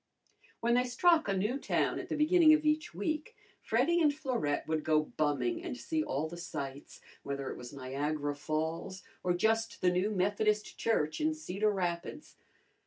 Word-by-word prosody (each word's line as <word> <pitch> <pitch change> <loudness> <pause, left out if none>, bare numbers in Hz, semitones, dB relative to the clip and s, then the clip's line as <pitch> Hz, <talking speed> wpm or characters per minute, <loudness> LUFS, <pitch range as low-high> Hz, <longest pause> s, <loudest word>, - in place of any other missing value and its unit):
When 235 +1 +2
they 250 +1 +3
struck 320 +6 +3
a 195 -1 0
new 215 +8 0
town - - 0
at - - -7
the - - -1
beginning 310 +1 +6
of 310 0 -2
each 305 - +1
week 300 - -3 0.3
Freddy 295 +10 +2
and 300 -2 +5
Florette 250 - -2
would 155 -1 -1
go 155 -1 +3
bumming 155 - 0
and 300 -8 -5
see 315 +3 -1
all 150 - -2
the 170 +2 -8
sights, 140 -5 -7 0.2
whether 140 -1 -4
it - - -6
was 120 -1 -9
Niagara 145 +2 -2
Falls 160 +5 -3 0.2
or 180 -1 +1
just 225 +4 +1
the 180 - +4
new 180 +3 +1
Methodist 210 +2 0
Church 155 - 0
in 310 0 +1
Cedar 215 - -1
Rapids. 175 -4 -3
195 Hz, 175 wpm, -32 LUFS, -, 0.3 s, beginning